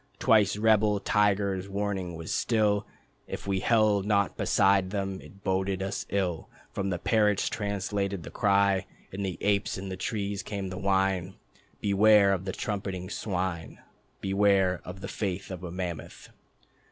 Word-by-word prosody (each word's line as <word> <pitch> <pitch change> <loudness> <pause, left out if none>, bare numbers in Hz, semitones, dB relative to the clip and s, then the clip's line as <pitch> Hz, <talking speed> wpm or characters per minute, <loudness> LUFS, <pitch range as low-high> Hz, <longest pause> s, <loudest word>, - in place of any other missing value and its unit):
Twice 105 -5 +4
rebel 105 -1 +3
tigers 100 -2 +1
warning 100 -3 -2
was 80 0 -5
still 105 -3 +1 0.4
If - - -6
we 100 -1 0
held 110 -2 +3
not 100 -2 +2
beside 95 -1 +3
them 95 -1 -3
it 100 +1 -16
boded 95 0 0
us 100 +1 -4
ill. 90 -5 -1 0.2
From 100 0 -2
the 90 - -1
parrots 105 +1 +2
translating 100 -2 -2
the - - -9
cry, 100 -1 +2 0.2
And 100 +1 -4
the 95 -3 -3
apes 100 -1 +1
in 95 0 -6
the 95 - -4
trees 100 0 -2
came 100 -3 -5
the 95 0 -6
whine: 95 -1 +1 0.5
"Beware 100 0 +5
of 95 -1 -3
the 95 - -2
trumpeting 95 -2 -4
swine. 90 -6 -3 0.4
Beware 95 -2 +2
of 90 +1 -9
the - - -5
faith 100 -2 -4
of 90 -1 -7
a 90 - -5
mammoth." 85 -4 -6
100 Hz, 155 wpm, -28 LUFS, 95-105 Hz, 0.5 s, Beware